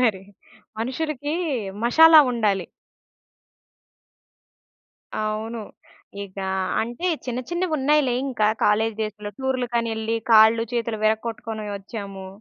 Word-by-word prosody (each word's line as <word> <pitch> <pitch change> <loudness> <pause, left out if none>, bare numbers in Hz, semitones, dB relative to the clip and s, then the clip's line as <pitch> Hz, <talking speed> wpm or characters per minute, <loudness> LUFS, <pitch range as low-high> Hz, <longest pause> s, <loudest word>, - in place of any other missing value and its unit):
మరి! 215 -7 +1 0.6
మనుషులకి 290 +4 -3 0.5
మషాలా 320 +6 +8
ఉండాలి! 205 -6 0 2.5
అవును. 215 +2 -3 0.6
ఇక 195 0 -13 0.4
అంటే 240 +11 -3 0.2
చిన్న 250 -1 -3
చిన్నవున్నాయిలే 300 -6 +1
ఇంక 255 -5 -5 0.2
కాలేజ్ 220 +1 +2
డేస్‌లో 210 -1 -5
టూరులకనెళ్ళి, 235 -4 -1
కాళ్ళు 225 +1 +6
చేతులు 230 -2 -2
విరకొట్టుకొని 220 0 -2
వచ్చాము. 195 -2 -8
230 Hz, 80 wpm, -23 LUFS, 215-255 Hz, 2.5 s, మషాలా